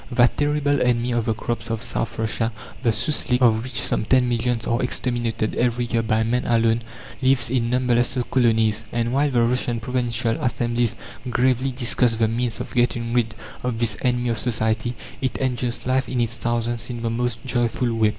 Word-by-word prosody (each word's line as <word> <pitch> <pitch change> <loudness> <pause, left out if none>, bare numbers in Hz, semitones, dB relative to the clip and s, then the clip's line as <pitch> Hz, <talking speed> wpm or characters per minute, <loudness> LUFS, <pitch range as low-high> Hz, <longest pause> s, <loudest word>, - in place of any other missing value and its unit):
That 120 0 +4
terrible 145 -1 +1
enemy 125 0 +1
of 120 -2 0
the 110 - 0
crops 115 0 -3
of 115 0 -2
South 115 -2 -3
Russia 115 +1 -1 0.3
the 120 - +2
souslik 125 +2 +1
of 115 -3 +4
which 120 -3 -3
some - - 0
ten 125 +3 +3
millions 120 -1 0
are 115 +1 0
exterminated 120 -3 -1
every 120 0 0
year 115 -1 0
by 110 0 +1
man 125 +3 0
alone, 115 0 +3 0.4
lives 130 -3 +3
in 120 -3 +1
numberless 125 0 +1
colonies; 115 -3 +2
and 120 0 -1
while 145 +2 +2
the 120 -3 +2
Russian 120 0 0
provincial 120 -1 -1
assemblies 120 -1 0 0.3
gravely 130 +1 +2
discuss 125 -2 +2
the 110 0 +2
means 115 0 -1
of - - -6
getting 120 -1 0
rid 115 -2 +1 0.3
of 125 -2 -2
this 115 -3 +2
enemy 125 -1 +1
of 115 -2 -1
society, 115 +1 0 0.3
it 130 -2 -1
enjoys 125 -2 -2
life 130 +1 +1
in 125 - -1
its 115 0 0
thousands 120 -1 -1
in 120 -1 -5
the 115 - 0
most 120 0 -2
joyful 120 -1 0
way. 110 -1 +3
120 Hz, 185 wpm, -23 LUFS, 115-125 Hz, 0.4 s, That